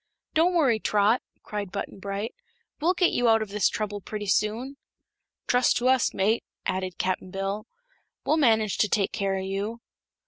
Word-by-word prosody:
"Don't 345 +3 +3
worry, 265 -10 +3
Trot," 210 +3 +2 0.2
cried 205 -3 -5
Button 200 -1 -5
Bright; 200 +3 -4 0.5
"we'll 345 +5 +2
get 355 - +3
you 245 -1 +2
out 225 -1 +4
of 215 - -9
this 205 -1 +2
trouble 205 -1 -3
pretty 210 +1 -5
soon." 225 +7 0 0.7
"Trust 245 0 +3
to 245 - +1
us, 260 -2 +3
mate," 215 +4 +1 0.2
added 185 -1 -2
Cap'n 185 0 -1
Bill; 195 +3 -3 0.6
"we'll 310 - +3
manage 220 -8 +3
to 210 - +3
take 200 -2 +1
care 195 -1 -1
o' 190 - -2
you." 200 +4 -3
210 Hz, 170 wpm, -26 LUFS, 195-240 Hz, 0.7 s, out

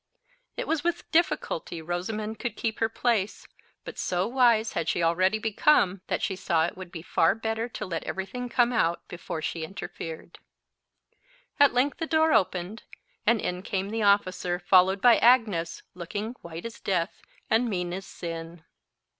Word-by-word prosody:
It - - -3
was 320 -2 0
with 345 0 -2
difficulty 305 - 0
Rosamond 210 +6 -4
could 240 - -3
keep 225 -1 -2
her 225 - +2
place, 225 -4 -1 0.4
but - - -8
so 180 +1 0
wise 235 -2 +3
had 165 -1 -1
she 170 - 0
already 185 +5 +3
become 215 -3 +2
that - - -2
she 190 - -1
saw 170 -3 +1
it 175 - -5
would 185 -2 -9
be 165 -3 -7
far 165 - +2
better 225 +1 -2
to 215 - -5
let 170 -4 -4
every 190 0 -3
thing 245 +5 -6
come 245 0 +2
out 170 -6 0
before 165 -2 -6
she 165 0 -3
interfered. 165 -2 -7 1.2
At 285 -1 +6
length 275 +6 +1
the 325 - -2
door 320 0 +3
opened, 190 0 0 0.5
and 230 -1 +4
in 180 -2 -3
came 195 0 -3
the 225 0 -2
officer, 185 -3 +2
followed 190 +1 +4
by 240 0 +7
Agnes, 215 -9 +3
looking 205 +5 -5
white 170 +2 -8
as 230 - -7
death 180 -1 -1 0.3
and 230 +2 +2
mean 180 -3 -2
as 190 +1 -6
sin. 165 -1 -7
195 Hz, 170 wpm, -27 LUFS, 175-230 Hz, 1.2 s, by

